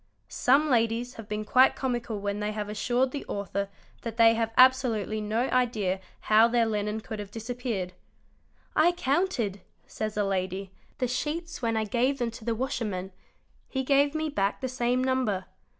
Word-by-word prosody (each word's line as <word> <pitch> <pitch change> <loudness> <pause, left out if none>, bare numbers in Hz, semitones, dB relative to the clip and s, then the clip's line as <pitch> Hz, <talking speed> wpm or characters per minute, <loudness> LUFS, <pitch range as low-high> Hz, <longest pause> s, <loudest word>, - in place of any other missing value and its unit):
Some 280 +5 +3
ladies 235 -1 +1
have 225 -1 -10
been 210 0 -3
quite 255 +5 +5
comical 240 -4 -2
when 200 0 -2
they 210 0 -2
have 210 -1 -4
assured 245 +4 0
the 285 - -4
author 200 0 -3 0.3
that 230 -1 -6
they 230 -1 +7
had 225 0 0
absolutely 245 -5 +4
no 215 +2 0
idea 220 -7 +1 0.2
how 220 +2 +5
their 235 -1 +2
linen 210 0 -1
could 215 0 -6
have 205 -1 -6
disappeared; 225 -4 -4 0.8
"I 340 +3 +5
counted"', 275 - 0 0.2
says 215 -1 -4
a 210 - +2
lady, 190 0 -2 0.3
"the 250 - 0
sheets 315 +6 -3
when 230 -2 0
I 220 - 0
§ 205 - -14
gave 255 +3 +2
them 240 -3 -1
to 225 - -11
the 230 0 -1
washerman; 210 -6 -3 0.6
he 265 -1 -1
gave 280 +2 +3
me 315 0 0
back 200 -9 0
the 260 - -2
same 250 0 0
number. 250 -8 0
230 Hz, 175 wpm, -28 LUFS, 210-255 Hz, 0.8 s, they